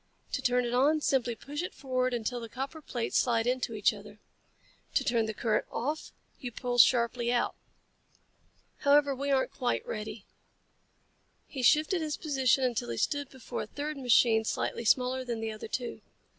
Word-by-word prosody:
To 260 Hz, -, -2 dB
turn 250 Hz, -1 st, +2 dB
it 240 Hz, -, -2 dB
on, 285 Hz, +5 st, +4 dB
simply 250 Hz, -5 st, +1 dB
push 290 Hz, +7 st, -5 dB
it 360 Hz, -, -5 dB
forward 255 Hz, -2 st, -1 dB
until 240 Hz, +1 st, -2 dB
the 230 Hz, -1 st, -7 dB
copper 270 Hz, +6 st, -5 dB
plates 240 Hz, -5 st, -1 dB
slide 230 Hz, -2 st, +2 dB
into 250 Hz, -2 st, -1 dB
each 210 Hz, -, +3 dB
other. -, -, -12 dB, 0.8 s
To -, -, +3 dB
turn 235 Hz, -4 st, +1 dB
the 220 Hz, -, -3 dB
current 215 Hz, -1 st, 0 dB
off, 295 Hz, +6 st, -3 dB, 0.3 s
you 245 Hz, -, -5 dB
pull 245 Hz, +1 st, -2 dB
sharply 235 Hz, 0 st, +4 dB
out. 240 Hz, -1 st, +1 dB, 1.2 s
However, 285 Hz, 0 st, +4 dB
we 280 Hz, +2 st, -3 dB
aren't 265 Hz, -1 st, +2 dB
quite 245 Hz, -2 st, -1 dB
ready." 215 Hz, -1 st, -6 dB, 1.2 s
He 270 Hz, -, -6 dB
shifted 310 Hz, +7 st, +4 dB
his 305 Hz, -1 st, -2 dB
position 270 Hz, -3 st, +2 dB
until 235 Hz, -, -1 dB
he 115 Hz, -, -3 dB
stood 285 Hz, -, -1 dB
before 260 Hz, -3 st, -6 dB
a -, -, -6 dB
third 295 Hz, +5 st, -4 dB
machine 240 Hz, -4 st, +4 dB
slightly 230 Hz, +1 st, -2 dB
smaller 255 Hz, +3 st, +2 dB
than 240 Hz, -3 st, -3 dB
the 225 Hz, 0 st, -3 dB
other 215 Hz, 0 st, -7 dB
two. 245 Hz, +2 st, -4 dB
250 Hz, 170 wpm, -30 LUFS, 235-275 Hz, 1.2 s, on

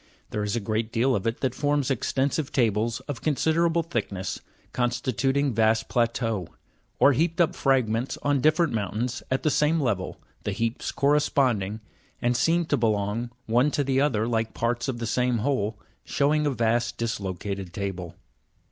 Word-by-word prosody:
There 105 Hz, -, -2 dB
is 105 Hz, +1 st, -1 dB
a -, -, +1 dB
great 110 Hz, +1 st, -2 dB
deal 125 Hz, +3 st, +2 dB
of 100 Hz, -, -2 dB
it 115 Hz, -, -2 dB
that 130 Hz, -3 st, 0 dB
forms 145 Hz, -1 st, 0 dB
extensive 135 Hz, +3 st, 0 dB
tables 115 Hz, -1 st, +1 dB
of 135 Hz, -1 st, -6 dB
considerable 165 Hz, +3 st, +2 dB
thickness, 100 Hz, -, -3 dB, 0.3 s
consti 120 Hz, +1 st, 0 dB
tuting 135 Hz, +3 st, +1 dB
vast 110 Hz, 0 st, +2 dB
plateaux; 115 Hz, -5 st, 0 dB, 0.5 s
or 140 Hz, -, +6 dB
heaped 165 Hz, +5 st, 0 dB
up 170 Hz, -, +3 dB
fragments 125 Hz, -3 st, +1 dB
on 145 Hz, -2 st, +2 dB
different 155 Hz, +1 st, +3 dB
moun 105 Hz, -4 st, -2 dB
tains, 120 Hz, +2 st, -2 dB
at 130 Hz, -, 0 dB
the 155 Hz, -, +2 dB
same 150 Hz, +4 st, +2 dB
level, 110 Hz, -10 st, -1 dB, 0.2 s
the 105 Hz, -, -2 dB
heaps 115 Hz, +3 st, -2 dB
corresponding, 135 Hz, -7 st, +1 dB, 0.4 s
and 120 Hz, 0 st, +1 dB
seem 165 Hz, +7 st, +2 dB
to 145 Hz, -, +1 dB
be 115 Hz, -2 st, +2 dB
long 105 Hz, +3 st, -1 dB, 0.2 s
one 120 Hz, +6 st, +3 dB
to 145 Hz, -, 0 dB
the 135 Hz, 0 st, +1 dB
other 115 Hz, -7 st, +1 dB
like 115 Hz, -1 st, -1 dB
parts 120 Hz, +2 st, -1 dB
of 130 Hz, -3 st, -2 dB
the 120 Hz, -, -3 dB
same 125 Hz, +1 st, +1 dB
whole, 110 Hz, -3 st, -1 dB, 0.3 s
showing 150 Hz, +1 st, +1 dB
a -, -, +3 dB
vast 120 Hz, -1 st, 0 dB
dislocated 100 Hz, -4 st, -3 dB
table. 90 Hz, -3 st, -5 dB
120 Hz, 170 wpm, -26 LUFS, 110-140 Hz, 0.5 s, or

